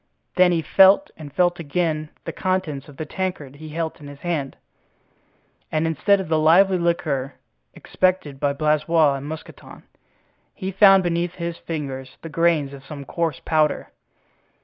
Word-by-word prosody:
Then 180 -1 +5
he 165 -2 0
felt 195 - +5
and 150 -3 -10
felt 175 +3 +1
again 155 -1 -2 0.2
the - - -3
contents 175 -7 -2
of 140 - -14
the 155 - -4
tankard 155 -5 -5
he 155 +1 -10
held 160 +1 -4
in 145 - -10
his 145 0 -12
hand; 155 -6 -3 1.1
and, 155 +1 0
instead 165 +6 +2
of 190 - -4
the 160 0 +1
lively 180 +4 +5
liquor 150 -6 -1 0.4
expected 185 -7 -1
by 140 0 +1
Blaisois 155 +1 +2
and 140 +1 -6
Mousqueton, 155 +1 -10 0.7
he 190 -1 -4
found 195 0 +6
beneath 175 0 -1
his 170 -1 -4
fingers 135 -5 -6
the 165 - -6
grains 160 -3 +1
of 135 -1 -11
some 140 -1 -9
coarse 165 -3 -2
powder. 155 -2 +1
160 Hz, 155 wpm, -22 LUFS, 145-175 Hz, 1.1 s, found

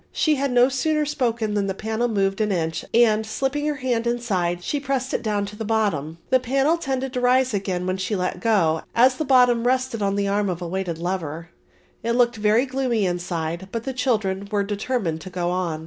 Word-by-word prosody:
She 310 - +2
had 280 -2 0
no 245 0 +5
sooner 300 +3 0
spoken 235 -7 -1
than 205 -1 0
the 195 - -2
panel 220 +3 -1
moved 195 -2 0
an 210 -1 +1
inch 165 -3 -1
and, 220 -2 +4
slipping 270 +7 -2
her 300 - 0
hand 245 -3 -1
inside, 185 -8 -1
she 290 - -1
pressed 270 -1 -2
it - - 0
down 205 -2 -1
to 205 +1 -9
the 220 - -5
bottom. 200 -9 -1
The 260 - +5
panel 270 +5 +2
tended 265 -4 -3
to 250 - -1
rise 255 0 +3
again 190 -3 -2
when 185 +1 -1
she 190 +3 -2
let 180 -1 -2
go, 175 -7 +2
as 255 +2 +5
the 310 - -2
bottom 245 -3 +4
rested 255 -3 0
on 200 0 +1
the 200 0 0
arm 200 0 +1
of 175 -2 -3
a 175 - -5
weighted 180 -2 -3
lever. 170 -2 -4 0.5
It 235 +1 -1
looked 240 -1 +2
very 215 +4 +3
gloomy 255 -5 0
inside 175 0 -3
but 230 -1 -3
the 265 - -3
children 210 -7 -1
were 205 -1 +1
determined 200 -5 -2
to 185 - -8
go 175 -1 -2
on. 175 -4 -2
215 Hz, 215 wpm, -23 LUFS, 185-255 Hz, 0.5 s, no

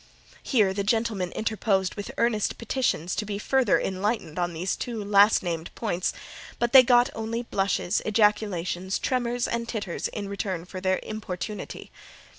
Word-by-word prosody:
Here 210 -8 +2
the 200 +1 -1
gentlemen 215 -4 0
interposed 205 -4 0
with 205 - -6
earnest 225 -3 +1
petitions 230 - -1
to - - 0
be 205 -1 -4
further 260 +4 +2
enlightened 190 -3 -2
on 175 0 0
these 175 +3 -2
two 230 -4 -4
last 205 +1 +5
named 170 -2 -3
points; 185 -5 -1 0.5
but 240 +1 0
they 265 - +11
got 245 +1 +4
only 225 +2 -3
blushes, 195 -5 0
ejaculations, 205 -4 +1
tremors, 245 -1 -1
and 235 0 -3
titters, 205 -6 -3
in 205 -2 -5
return 195 -3 -3
for 185 +1 -8
their 185 0 +2
importunity. 210 -1 -6
205 Hz, 150 wpm, -26 LUFS, 185-230 Hz, 0.5 s, they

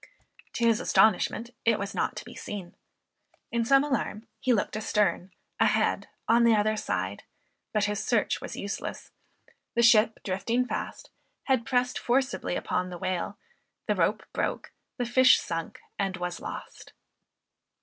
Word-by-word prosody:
To 235 - 0
his 230 -2 +4
astonishment 220 +3 +2
it 230 -2 +3
was 200 -1 -4
not - - -1
to - - -7
be - - -10
seen. 195 -4 -7 0.8
In 235 0 +1
some 275 +4 +5
alarm 265 -6 -2
he 255 - +1
looked 215 -3 +1
a 215 - -2
stern, 195 -4 0 0.3
a - - +5
head, - - +1 0.2
on 235 +1 +5
the 230 -1 +6
other 215 +1 +2
side, 100 - -2 0.5
but 215 - +1
his 205 0 -1
search 235 -4 +1
was - - -6
useless; 200 0 -5 0.6
the 235 - +3
ship 225 -2 +5
drifting 210 +6 0
fast, - - -5 0.3
had 260 -4 +1
pressed 250 0 +1
forcibly 260 -6 0
upon 180 0 -1
the 180 - -6
whale, 185 +2 -3 0.5
the - - +2
rope - - +1
broke, - - -2 0.3
the 245 - -1
fish 255 +2 +6
sunk 165 0 -5 0.2
and 195 -1 -1
was 180 0 -4
lost. - - -8
215 Hz, 155 wpm, -28 LUFS, 195-240 Hz, 0.8 s, the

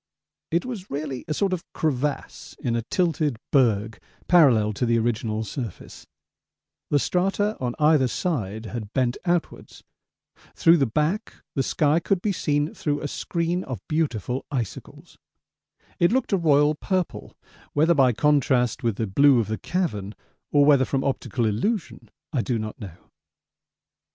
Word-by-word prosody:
It 170 +6 0
was 220 -7 -6
really 140 -2 -4
a 155 - -1
sort 195 -2 0
of 175 - -3
crevasse 145 -2 -3
in 120 -2 -2
a 115 - 0
tilted 155 - 0
berg 115 -5 +2 0.3
parallel 125 -12 +5
to 125 - -1
the 115 0 +3
original 110 -1 -1
surface; 110 -2 -7 0.8
the 145 - +3
strata 195 +7 0
on 125 -2 -2
either 150 -3 +4
side 110 - -3
had 110 -2 -6
bent 125 -1 +1
outwards; 175 -1 -2 0.7
through 165 +1 +5
the 135 -4 +2
back 155 - -1 0.2
the 135 - 0
sky 150 +4 +2
could 190 +2 0
be 205 +3 -1
seen 150 -4 0
through 145 -1 -2
a 145 - -3
screen 170 +4 -2
of 130 -3 -7
beautiful 130 - -1
icicles 120 -8 -6 0.8
it 170 - +4
looked 250 -3 0
a - - +4
royal 150 -3 +4
purple, 185 +3 -3 0.4
whether 160 +4 +4
by 135 -5 +4
contrast 130 -2 +2
with 115 -5 0
the 110 - -2
blue 130 +6 +4
of 110 - -1
the 110 -2 -3
cavern 105 - -2 0.4
or 145 -1 +5
whether 140 -3 +5
from 135 +1 -1
optical 130 -3 -1
illusion 165 - -2 0.2
I 130 - +1
do 120 0 -1
not 110 +3 -6
know. 90 -4 -11
140 Hz, 150 wpm, -24 LUFS, 115-165 Hz, 0.8 s, parallel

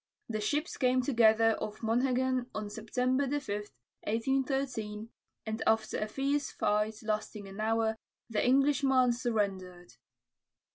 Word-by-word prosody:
The 215 -2 -3
ships 295 +10 -1
came 255 -1 +2
together 225 -3 +4
off 210 0 -5
Monhegan 255 +2 +1
on 210 -1 -4
September 250 +5 0
5, 290 +2 0 0.6
1813, 230 -2 -1 0.4
and 220 0 -3
after 220 0 +2
a 215 - -1
fierce 275 +5 -1
fight 210 +2 0
lasting 215 -1 -3
an 195 +2 -10
hour, 220 0 +1 0.3
the 220 -2 0
Englishman 270 -1 +4
surrendered. 195 -7 -2
225 Hz, 115 wpm, -31 LUFS, 215-260 Hz, 0.6 s, together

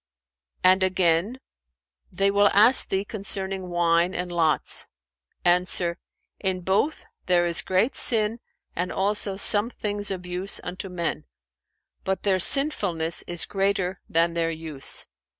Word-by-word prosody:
[FN#405] 60 0 -62
And 190 +1 +1
again, 185 +4 +1 0.7
'They 195 +2 +1
will 205 0 +4
ask 220 +6 +5
thee 195 +1 -1
concerning 195 -3 -5
wine 175 +1 +1
and 180 0 -4
lots': 165 -3 0 0.6
Answer, 175 -1 +1 0.4
'In 190 -2 -2
both 195 - -1 0.2
there 175 -1 +2
is 170 0 +2
great 190 +10 0
sin 225 0 +2 0.4
and 180 +1 -3
also 200 0 0
some 205 +2 +4
things 205 -3 -3
of 185 -2 -5
use 180 +2 -1
unto 185 +2 -6
men: 170 -2 -4 0.8
but 190 0 -3
their 190 -2 +1
sinfulness 180 - +2
is 175 -1 0
greater 195 -2 -2
than 165 +1 +1
their 165 -1 -1
use.' 160 -4 0
185 Hz, 135 wpm, -24 LUFS, 170-200 Hz, 0.8 s, ask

